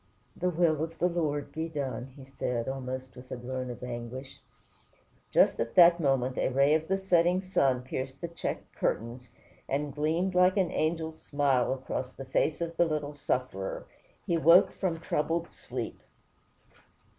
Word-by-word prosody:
"The 180 Hz, -, 0 dB
will 160 Hz, -3 st, +2 dB
of 165 Hz, 0 st, -6 dB
the 175 Hz, -, +2 dB
Lord 155 Hz, -5 st, -1 dB
be 160 Hz, +1 st, -3 dB
done," 135 Hz, -4 st, -4 dB
said 125 Hz, -3 st, -3 dB
he, -, -, -2 dB
almost 130 Hz, -1 st, -6 dB
with 125 Hz, 0 st, -13 dB
a -, -, -3 dB
groan 130 Hz, +1 st, -4 dB
of 120 Hz, 0 st, -7 dB
anguish. 125 Hz, +2 st, -6 dB, 0.9 s
Just -, -, +4 dB
at 115 Hz, 0 st, -2 dB
that 170 Hz, -1 st, +8 dB
moment 135 Hz, -4 st, +1 dB
a -, -, +2 dB
ray 140 Hz, +3 st, +4 dB
of 160 Hz, 0 st, +1 dB
the 195 Hz, -, +1 dB
setting 180 Hz, -1 st, +3 dB
sun 135 Hz, -9 st, +1 dB
pierced 130 Hz, +1 st, -5 dB
the 170 Hz, -, -3 dB
checked 170 Hz, -, -5 dB
curtains, 120 Hz, +2 st, -2 dB, 0.4 s
and 145 Hz, +1 st, -1 dB
gleamed 160 Hz, +6 st, 0 dB
like 180 Hz, +2 st, +4 dB
an 185 Hz, -3 st, +2 dB
angel's 160 Hz, 0 st, -1 dB
smile 140 Hz, -4 st, +1 dB
across 130 Hz, -1 st, -3 dB
the 135 Hz, -, -8 dB
face 150 Hz, +5 st, 0 dB
of 165 Hz, 0 st, -3 dB
the 175 Hz, -, +5 dB
little 150 Hz, -2 st, -2 dB
sufferer. 125 Hz, -9 st, -3 dB, 0.4 s
He 170 Hz, -, +1 dB
woke 170 Hz, +3 st, +7 dB
from 175 Hz, -4 st, -2 dB
troubled 165 Hz, +1 st, -1 dB
sleep. -, -, -6 dB
145 Hz, 165 wpm, -29 LUFS, 130-170 Hz, 0.9 s, that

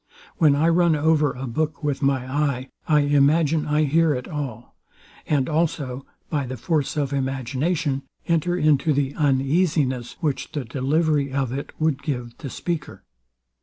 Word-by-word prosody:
When 150 Hz, -4 st, +5 dB
I 155 Hz, +3 st, +2 dB
run 170 Hz, -1 st, +4 dB
over 150 Hz, 0 st, +3 dB
a 130 Hz, +2 st, -6 dB
book 155 Hz, +6 st, -2 dB
with 145 Hz, -2 st, -1 dB
my 135 Hz, -2 st, +1 dB
eye, 135 Hz, -1 st, -1 dB, 0.2 s
I 150 Hz, -2 st, +4 dB
imagine 145 Hz, +2 st, +3 dB
I 150 Hz, +1 st, +2 dB
hear 155 Hz, +1 st, +3 dB
it 125 Hz, -, -5 dB
all; 135 Hz, -6 st, -6 dB, 0.5 s
and 140 Hz, -4 st, +1 dB
also, 150 Hz, -5 st, -1 dB, 0.2 s
by 145 Hz, -4 st, -2 dB
the 130 Hz, +1 st, -5 dB
force 155 Hz, +4 st, -1 dB
of 140 Hz, -1 st, -1 dB
imagination, 135 Hz, +3 st, -1 dB, 0.3 s
enter 170 Hz, +1 st, +1 dB
into 155 Hz, -1 st, +3 dB
the 140 Hz, 0 st, 0 dB
uneasiness, 140 Hz, -2 st, +1 dB
which 155 Hz, -1 st, -2 dB
the 145 Hz, -5 st, -3 dB
delivery 140 Hz, +3 st, +1 dB
of 135 Hz, -2 st, -1 dB
it 140 Hz, +2 st, -5 dB
would 155 Hz, -3 st, +1 dB
give 125 Hz, -6 st, -4 dB
the 140 Hz, -, -6 dB
speaker. 170 Hz, +2 st, -4 dB
145 Hz, 155 wpm, -23 LUFS, 135-155 Hz, 0.5 s, When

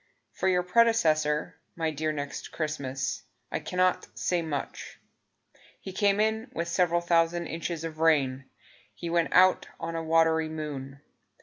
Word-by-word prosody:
For -, -, -2 dB
your 180 Hz, -1 st, +3 dB
predecessor, 160 Hz, -9 st, +2 dB, 0.2 s
My 160 Hz, -1 st, -1 dB
dear 155 Hz, +1 st, -1 dB
Next 145 Hz, -2 st, -5 dB
Christmas, 135 Hz, -5 st, -3 dB, 0.3 s
I -, -, -1 dB
cannot 185 Hz, 0 st, 0 dB
say 175 Hz, -1 st, 0 dB
much. 150 Hz, -4 st, -5 dB, 0.8 s
He 190 Hz, -, -8 dB
came 200 Hz, +1 st, +2 dB
in 220 Hz, +3 st, 0 dB
with 170 Hz, +1 st, -2 dB
several 170 Hz, 0 st, +2 dB
thousand 170 Hz, 0 st, +2 dB
inches 165 Hz, 0 st, -4 dB
of 160 Hz, -1 st, -6 dB
rain; 140 Hz, -5 st, +2 dB, 0.5 s
He 170 Hz, +7 st, -5 dB
went 170 Hz, -1 st, +2 dB
out 185 Hz, 0 st, +5 dB
on 165 Hz, 0 st, -4 dB
a 165 Hz, -, -2 dB
watery 160 Hz, 0 st, +3 dB
moon. 140 Hz, -3 st, -6 dB
165 Hz, 140 wpm, -28 LUFS, 155-180 Hz, 0.8 s, out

